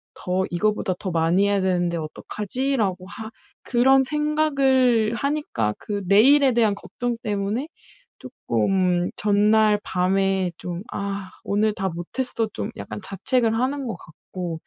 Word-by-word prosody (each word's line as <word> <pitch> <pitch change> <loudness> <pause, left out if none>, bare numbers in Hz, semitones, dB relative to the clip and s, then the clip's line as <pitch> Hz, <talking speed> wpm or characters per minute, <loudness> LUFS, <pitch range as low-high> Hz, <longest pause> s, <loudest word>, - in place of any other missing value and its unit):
더 185 +1 -1
이거보다 195 +1 0
더 185 - -4
많이 170 +4 +2
해야 200 -1 +2
되는데 175 -2 0
어떡하지?'라고 205 - -3
하 220 +1 -8 0.3
그런 265 +2 +4
생각을 270 -6 +2
하니까 275 - -1
그 205 -1 -4
내일에 260 +6 +6
대한 225 -3 +3
걱정 240 +3 -4
때문에 210 +6 -2 0.5
조금 180 - 0
전날 210 +1 +3
밤에 190 0 +1
좀 175 0 -5
'아 200 -1 -4
오늘 210 +1 +1
다 190 0 -2
못했어.' 225 +7 -3
좀 220 - -4
약간 - - -6
자책을 225 +4 0
하는 265 +3 -1
것 225 - -3
같고 170 0 -7
205 Hz, 260 characters per minute, -23 LUFS, 185-250 Hz, 0.5 s, 내일에